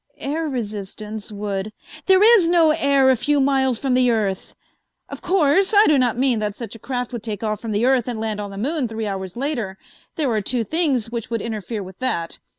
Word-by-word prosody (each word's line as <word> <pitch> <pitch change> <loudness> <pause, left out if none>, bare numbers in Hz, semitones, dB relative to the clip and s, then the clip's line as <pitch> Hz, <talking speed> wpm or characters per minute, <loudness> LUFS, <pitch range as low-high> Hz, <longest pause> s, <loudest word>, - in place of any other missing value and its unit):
"Air 310 +3 -3
resistance 215 -2 -6
would 205 0 -4 0.2
" - - -16
"There 380 +1 +5 0.2
is 335 -2 +1
no 335 -3 +4
air 280 -3 +3
a - - +3
few 290 +4 0
miles 265 -2 +2
from 265 +2 -1
the 250 0 +3
earth. 205 -5 -2 0.5
Of - - -8
course, 375 +3 +2
I 420 - +8
do 300 -3 +4
not 245 -2 +1
mean 255 -3 +2
that 210 -1 -3
such 235 - -7
a 225 - -10
craft 250 +1 -4
would 240 - -4
take 215 -1 -5
off 215 -1 -2
from 230 - -5
the 210 +3 +1
earth 255 -2 +2
and 240 -3 -4
land 220 -1 -3
on 205 - -6
the 195 - -9
moon 275 +4 -1
three 220 0 -5
hours 190 -1 -5
later. 240 -8 -2 0.4
There 290 -6 0
are 215 -2 0
two 240 +3 -1
things 270 - 0
which 235 -2 -5
would 230 -1 -2
interfere 220 -1 -4
with 190 0 -12
that. 170 -10 -2
235 Hz, 225 wpm, -21 LUFS, 215-275 Hz, 0.5 s, I